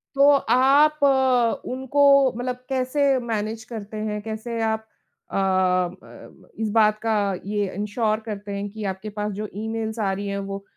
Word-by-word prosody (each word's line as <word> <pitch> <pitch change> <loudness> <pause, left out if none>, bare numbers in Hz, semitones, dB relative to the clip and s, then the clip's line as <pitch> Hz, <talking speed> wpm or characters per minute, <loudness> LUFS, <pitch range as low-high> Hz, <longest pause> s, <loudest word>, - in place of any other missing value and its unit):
तो 280 +1 +6
आप 280 +3 +4
अ, 260 -4 +3
उनको 265 +2 -1 0.4
मतलब 250 0 -2
कैसे 265 +1 +1
मैनेज 225 -1 -3
करते 215 -1 -6
हैं? 210 -1 -3
कैसे 225 +2 -5
आप 220 0 -1 0.4
अ, - - -5
ब 185 -2 +1
ब - - -15
इस 220 -1 -1
बात 215 -1 +4
का 225 -1 0 0.3
ये 205 -1 -1
इंश्योर 215 +2 -1
करते 205 -2 -6
हैं 200 +1 -4
कि 215 +1 -8
आपके 190 +3 -8
पास 210 0 -3
जो 210 +2 -5 0.2
ईमेल्स 220 0 -3
आ 200 -3 +1
रही 200 +1 -4
है 200 0 -2
वो 195 0 -5
220 Hz, 165 wpm, -23 LUFS, 205-245 Hz, 0.4 s, तो